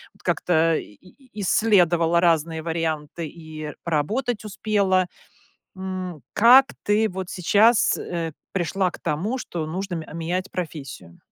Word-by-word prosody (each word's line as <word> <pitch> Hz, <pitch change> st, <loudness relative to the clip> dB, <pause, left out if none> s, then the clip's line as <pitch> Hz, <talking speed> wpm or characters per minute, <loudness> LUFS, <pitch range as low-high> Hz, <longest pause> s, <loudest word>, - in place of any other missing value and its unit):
от -, -, -23 dB
как-то 165 Hz, -1 st, +2 dB
и 105 Hz, -, -6 dB
и 240 Hz, -, -16 dB
исследовала 175 Hz, -5 st, +3 dB
разные 165 Hz, -2 st, +2 dB
варианты 160 Hz, -1 st, -3 dB
и 155 Hz, -1 st, -8 dB
поработать 215 Hz, -, -1 dB
успела. 200 Hz, -3 st, +1 dB, 0.7 s
М, 185 Hz, -5 st, -5 dB
как 255 Hz, +5 st, +7 dB, 0.2 s
ты 215 Hz, +1 st, +2 dB
вот 185 Hz, 0 st, -5 dB
сейчас, 210 Hz, +6 st, +4 dB
э, 165 Hz, -2 st, -3 dB, 0.2 s
пришла 185 Hz, 0 st, 0 dB
к -, -, -11 dB
тому, 200 Hz, -, -2 dB
что 165 Hz, -9 st, -4 dB
нужно 185 Hz, +3 st, -4 dB
мень 160 Hz, -, -5 dB
а, -, -, -12 dB
менять 175 Hz, +3 st, -3 dB
профессию? 145 Hz, -, -7 dB
175 Hz, 135 wpm, -23 LUFS, 160-200 Hz, 0.7 s, как